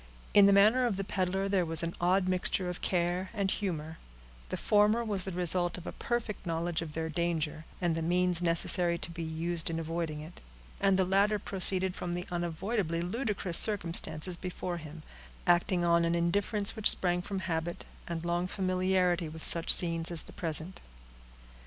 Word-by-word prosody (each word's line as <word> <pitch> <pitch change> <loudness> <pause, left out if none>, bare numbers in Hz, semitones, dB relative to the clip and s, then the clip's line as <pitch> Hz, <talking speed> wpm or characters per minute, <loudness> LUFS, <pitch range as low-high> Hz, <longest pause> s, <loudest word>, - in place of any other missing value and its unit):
In 200 -1 +7
the - - +5
manner 215 +6 +4
of 205 -5 -2
the 195 - -2
peddler 190 0 -2
there 195 -2 +1
was 165 0 +1
an 170 0 -3
odd 185 +1 +2
mixture 185 0 +1
of 180 - -8
care 180 +1 -1
and 195 -2 -1
humor; 160 -5 -4 0.5
the - - -4
former 210 +2 +2
was 200 -4 -3
the 190 - -5
result 175 0 0
of 175 - -11
a - - -5
perfect 240 -4 -4
knowledge 170 -1 -2
of 160 -2 -7
their 160 +1 -3
danger, 160 -1 -3
and 175 -2 0
the 165 - -3
means 180 +1 +2
necessary 170 0 +1
to 170 - -6
be 170 0 -7
used 165 +1 -2
in 165 - -3
avoiding 165 -1 -4
it; 155 +3 -11 0.4
and 195 -1 +2
the 190 - +2
latter 200 +3 +2
proceeded 190 -1 +1
from 175 -1 -4
the 180 +1 -5
unavoidably 175 +1 -2
ludicrous 200 -3 +2
circumstances 175 -4 +2
before 180 -1 -5
him, 155 -1 -10 0.4
acting 175 0 +2
on 170 0 +3
an 170 0 0
indifference 200 +5 +1
which 220 -2 +7
sprang 180 -1 +2
from 195 +1 -5
habit, 170 -1 -4 0.2
and 170 -1 -5
long 175 +1 -1
familiarity 185 -2 0
with 160 +1 -9
such 170 -1 +3
scenes 165 -2 +5
as 170 -2 +1
the - - -14
present. 165 +2 -3
175 Hz, 180 wpm, -30 LUFS, 165-190 Hz, 0.5 s, In